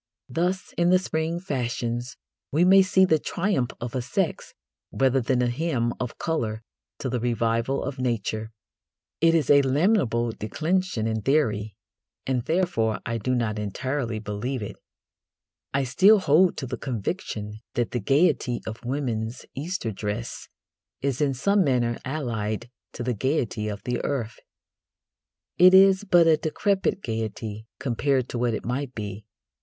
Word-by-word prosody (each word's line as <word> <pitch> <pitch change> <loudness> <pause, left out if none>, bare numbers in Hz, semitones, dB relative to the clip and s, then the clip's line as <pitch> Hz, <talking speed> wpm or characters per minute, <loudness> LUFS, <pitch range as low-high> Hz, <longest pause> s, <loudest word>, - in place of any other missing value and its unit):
Thus 180 +7 -1
in 175 0 +4
the 185 - +6
spring 165 -2 -2
fashions 120 -6 -3 0.3
we 160 +5 +3
may 195 +1 +7
see 190 0 +4
the 160 -4 +3
triumph 170 - -1
of 120 +1 -5
a 130 - -1
sex 120 0 -2 0.4
rather 135 0 +2
than 125 +1 +1
a - - +2
hymn 120 -3 0
of 125 -2 -4
colour 115 -9 -2 0.3
to - - -4
the 125 -1 -1
revival 115 +2 0
of 140 -1 -5
Nature. 110 -3 -2 0.7
It 165 +1 +4
is 155 -5 +2
a 140 0 +7
lamentable 135 - +2
declension 155 - -1
in 110 -1 -1
theory, 110 -7 +1 0.5
and 130 -2 0
therefore 160 - +1
I 115 0 -2
do 130 +3 0
not 110 -3 -1
entirely 120 +3 -2
believe 110 +4 -3
it. 105 - -6 1.0
I 140 0 +1
still 185 - +5
hold 180 0 +4
to 135 - -3
the 125 0 -4
conviction 110 - -4 0.2
that 120 -1 0
the 120 - -1
gaiety 125 - +2
of 110 +2 -7
women's 120 -3 -3
Easter 155 - -3
dress 105 - -5 0.5
is 135 -1 -1
in 140 -2 +2
some 200 +9 +3
manner 120 -5 +1
allied 120 -5 -3 0.2
to 120 - -5
the 125 0 0
gaiety 120 -3 -1
of 105 -1 -5
the 125 -1 -2
earth. 120 -6 -3 1.2
It 185 +1 +8
is 195 +1 +6
but 175 -3 +5
a 160 -1 +5
decrepit 190 +5 0
gaiety 110 -1 -4
compared 130 0 0
to 120 - -3
what 120 -2 +1
it - - -6
might 130 +2 -3
be. 105 -1 -6
125 Hz, 150 wpm, -25 LUFS, 115-155 Hz, 1.2 s, It